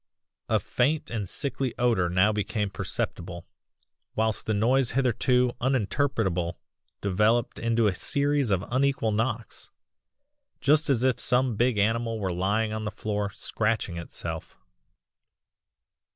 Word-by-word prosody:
"A - - +3
faint 145 +5 0
and 105 -5 -3
sickly 135 -2 -3
odour 115 -8 +2
now 90 +4 +4
became 105 -1 -2
perceptible 85 -1 -4 0.7
whilst 110 -1 0
the 110 - +2
noise 125 +4 +2
hitherto 125 -1 +2
uninterpretable 110 - 0 0.5
developed 105 +4 +1
into 115 0 +2
a 105 - +3
series 145 - 0
of 95 -1 +1
unequal 135 -3 +1
knocks 115 +1 -2 0.9
just 150 +2 +3
as 125 -3 +2
if 130 -2 +2
some 125 -1 +2
big 120 +1 +2
animal 115 +2 +1
were 95 -4 -2
lying 105 +5 0
on 110 0 -3
the 105 - -2
floor 105 -1 -2
'scratching' 105 -2 -2
itself. 85 - -6
115 Hz, 125 wpm, -27 LUFS, 105-125 Hz, 0.9 s, now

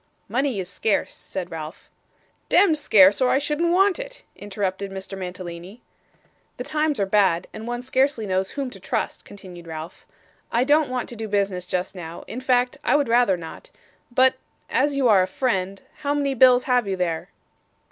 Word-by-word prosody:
'Money 260 -4 -1
is 185 - -4
scarce,' 200 +3 -1
said 185 -2 -7
Ralph. 160 0 -8 0.6
'Demd 370 -6 +5
scarce, 200 -8 +5
or 255 - +4
I - - +3
shouldn't 300 +4 0
want 390 +3 +3
it,' - - -8
interrupted 200 -1 -4
Mr. 195 0 -7
Mantalini. 180 +2 -8 0.7
'The - - -4
times 305 -3 0
are 200 - +2
bad, 190 -3 +2
and 220 +1 -8
one 240 0 -4
scarcely 260 -2 +1
knows 190 0 0
whom 275 -3 -4
to - - -11
trust,' - - -3
continued 180 -4 -12
Ralph. 160 +2 -8 0.4
'I 235 - +2
don't 295 +1 +3
want 255 -1 -3
to 240 - -8
do 225 -1 -5
business 195 -3 -1
just 180 0 -2
now, 170 -2 -8
in 245 +4 -6
fact 255 +1 +1
I - - +3
would 285 -4 +1
rather 235 -5 +4
not; 165 -2 -10 0.4
but 260 +2 +4 0.4
as 280 +4 +2
you 270 -2 +2
are 205 -4 +6
a 185 - +1
friend 195 -7 -2
how 285 -1 -1
many 280 -1 0
bills 255 -1 +6
have 250 -4 +1
you 195 - -1
there? 170 -3 -2
220 Hz, 180 wpm, -23 LUFS, 185-265 Hz, 0.7 s, are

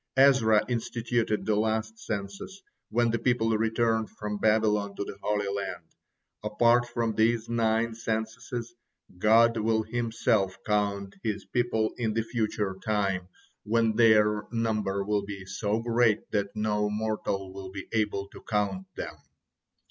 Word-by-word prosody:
Ezra 120 -6 +5
instituted 115 -2 -1
the 110 - +2
last 110 +1 -1
census 100 - -6 0.3
when 120 0 +2
the 115 - 0
people 115 -2 +2
returned 115 0 +1
from 105 0 -5
Babylon 105 -2 +2
to - - -3
the - - -7
Holy 105 -1 0
Land. 100 -2 -3 0.6
Apart 120 +3 +3
from 120 -1 -1
these 110 +1 +2
nine 115 0 +1
censuses, 115 +2 -4 0.5
God 115 +3 +5
will 110 0 +1
Himself 110 -4 0
count 100 -2 -1
His 105 -3 -3
people 115 -3 0
in 110 -3 0
the 115 - +1
future 110 -4 -2
time 100 -4 0 0.3
when 115 0 +1
their 105 -2 +4
number 105 -4 0
will 105 0 0
be 100 -1 -7
so 105 +3 -1
great 115 -2 +2
that 100 0 -1
no 105 -1 0
mortal 105 -3 -2
will 95 -1 -7
be 95 -1 -7
able 105 -3 0
to - - -13
count 100 -3 -1
them. - - -5
110 Hz, 140 wpm, -28 LUFS, 105-115 Hz, 0.6 s, Ezra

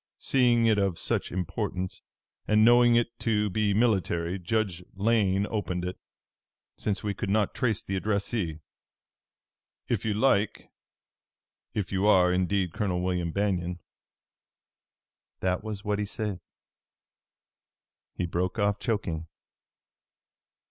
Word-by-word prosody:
Seeing 120 -3 +3
it 110 -2 +4
of 95 -4 0
such - - -1
importance, 90 +1 -3 0.5
and 110 0 +5
knowing 120 0 +6
it 120 0 0
to 105 -3 +1
be 105 +1 +1
military, 95 -5 +1
Judge 95 -1 -1
Lane 100 -2 +2
opened 90 -5 -2
it, 90 - -3 0.8
since 105 -1 -2
we 105 -1 -1
could 95 - -4
not 105 0 +1
trace 115 -6 0
the 95 - -3
addressee. 100 -4 -1 1.3
If - - -1
you 110 -2 0
like 105 -3 +1 1.0
if 100 -5 -2
you 100 +1 +1
are, 90 -3 +5
indeed, 90 -1 0
Colonel 90 -4 -1
William 90 -2 -1
Banion' 90 -2 -1 1.6
that 95 +1 -1
was 105 -3 -6
what 105 0 0
he 105 - 0
said." 105 -2 -4 1.8
He 90 - -1
broke 90 +4 -2
off, 100 -1 +1
choking. 85 -8 -2
100 Hz, 120 wpm, -28 LUFS, 90-110 Hz, 1.8 s, knowing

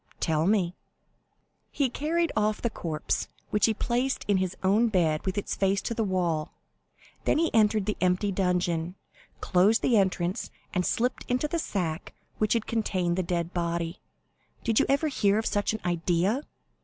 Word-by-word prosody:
"Tell 160 +1 +1
me." 190 -4 +2 1.0
"He 280 - +1
carried 320 +6 0
off 215 0 +1
the 235 - -1
corpse, 155 -6 -2 0.2
which 210 +1 +3
he 225 - +2
placed 250 +4 -1
in 205 -2 +3
his 185 -1 -2
own 205 +5 +4
bed 165 -7 +1
with 190 - -1
its 205 - -2
face 195 0 +1
to - - -2
the 225 - 0
wall; 175 -5 -1 0.7
then - - +3
he 330 +1 +1
entered 215 -2 +3
the 210 - -2
empty 185 +3 +2
dungeon, 180 -2 0 0.5
closed 195 +5 +3
the 235 - +4
entrance, 185 -2 0 0.2
and 180 -2 +1
slipped 250 +2 0
into 250 +4 0
the 335 +2 -1
sack 175 - -3 0.2
which 215 -1 +2
had 230 -2 0
contained 185 -6 0
the 185 - +1
dead 170 -1 -2
body. 170 0 -2 0.6
Did 225 -2 +2
you - - +2
ever 280 +3 +2
hear 205 -8 +2
of 220 - -1
such 205 0 +1
an 220 - -3
idea?" 175 - +1
195 Hz, 170 wpm, -27 LUFS, 175-225 Hz, 1.0 s, own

